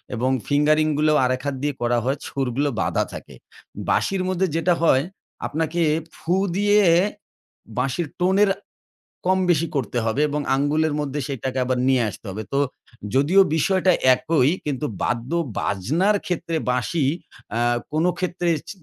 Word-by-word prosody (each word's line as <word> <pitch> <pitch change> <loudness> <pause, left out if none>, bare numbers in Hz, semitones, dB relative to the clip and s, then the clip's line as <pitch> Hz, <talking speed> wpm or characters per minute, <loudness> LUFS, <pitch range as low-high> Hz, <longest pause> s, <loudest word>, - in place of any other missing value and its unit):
এবং 125 +3 0 0.2
ফিঙ্গারিং 155 +2 +3
গুলো 155 +1 +3
আরেক 130 0 0
হাত 140 -1 -1
দিয়ে 145 0 0
করা 120 0 +1
হয়, 135 +3 0
সুরগুলো 135 +1 -1
বাঁধা - - +1
থাকে। - - -9 0.5
বাঁশির 195 -1 +1
মধ্যে 185 0 +1
যেটা 170 +2 +2
হয়, 135 -4 +4 0.4
আপনাকে 160 +2 -2 0.3
ফু 175 +3 -1 0.2
দিয়ে 205 +1 +4 1.0
বাঁশির 135 +6 -1
টোনের 190 +3 +4 0.8
কমবেশি 180 -3 +2
করতে 125 -2 -1
হবে 115 +5 0
এবং 150 +1 -1 0.2
আঙ্গুলের 150 +2 +1
মধ্যে 145 0 -3
সেটাকে 130 -1 -3
আবার 125 0 0
নিয়ে 130 -2 +3
আসতে 110 - -12
হবে। 105 +3 -5
তো 140 - +1 0.6
যদিও 150 +9 +4 0.2
বিষয়টা 185 +3 +3 0.2
একই, 150 -1 +2 0.2
কিন্তু 145 0 -1 0.2
বাদ্য-বাজনার 135 - 0
ক্ষেত্রে 165 -2 -2
বাঁশি, 125 +5 0 0.5
আ - - +1 0.3
কোনো 160 +3 +2
ক্ষেত্রে 175 -1 -2
ইছ - - -17
150 Hz, 135 wpm, -22 LUFS, 130-175 Hz, 1.0 s, হয়